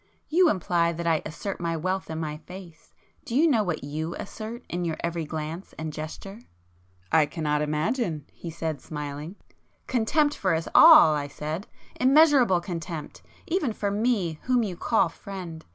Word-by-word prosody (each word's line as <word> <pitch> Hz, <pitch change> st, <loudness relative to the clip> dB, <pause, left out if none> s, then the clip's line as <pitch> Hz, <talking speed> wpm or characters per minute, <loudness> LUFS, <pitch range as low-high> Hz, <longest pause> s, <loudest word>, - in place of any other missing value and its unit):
You 350 Hz, +2 st, +5 dB
imply 170 Hz, -, +1 dB
that 170 Hz, +1 st, -5 dB
I 165 Hz, -2 st, +2 dB
assert 175 Hz, +5 st, -5 dB
my 165 Hz, -1 st, -1 dB
wealth 185 Hz, +4 st, -2 dB
in 160 Hz, 0 st, -4 dB
my 150 Hz, -2 st, -4 dB
face; 175 Hz, 0 st, -12 dB, 0.3 s
do 245 Hz, -6 st, -5 dB
you 315 Hz, +5 st, +5 dB
know 250 Hz, -8 st, +3 dB
what 175 Hz, -8 st, -2 dB
you 155 Hz, +4 st, -4 dB
assert 225 Hz, +4 st, -7 dB
in 175 Hz, +1 st, -3 dB
your 165 Hz, -2 st, -2 dB
every 170 Hz, -1 st, -2 dB
glance 160 Hz, +4 st, -6 dB
and 155 Hz, -1 st, -5 dB
gesture?" 175 Hz, +7 st, -7 dB, 0.7 s
"I 155 Hz, -2 st, +4 dB
cannot 150 Hz, -1 st, -1 dB
imagine!" 155 Hz, -, -1 dB
he 170 Hz, -, -8 dB
said 160 Hz, -3 st, -4 dB
smiling. 150 Hz, +3 st, -6 dB, 0.5 s
"Contempt 290 Hz, +5 st, +1 dB
for 185 Hz, -4 st, +1 dB
us 160 Hz, +1 st, -3 dB
all!" 310 Hz, -, +9 dB
I 145 Hz, -1 st, -2 dB
said—"Immeasurable 235 Hz, -, +2 dB
contempt,—even 180 Hz, -, -4 dB
for 205 Hz, -1 st, -2 dB
me, 200 Hz, -7 st, 0 dB
whom 250 Hz, -2 st, +2 dB
you 190 Hz, -5 st, -3 dB
call 170 Hz, -, +2 dB
friend. 170 Hz, -2 st, -8 dB
170 Hz, 155 wpm, -26 LUFS, 155-215 Hz, 0.7 s, all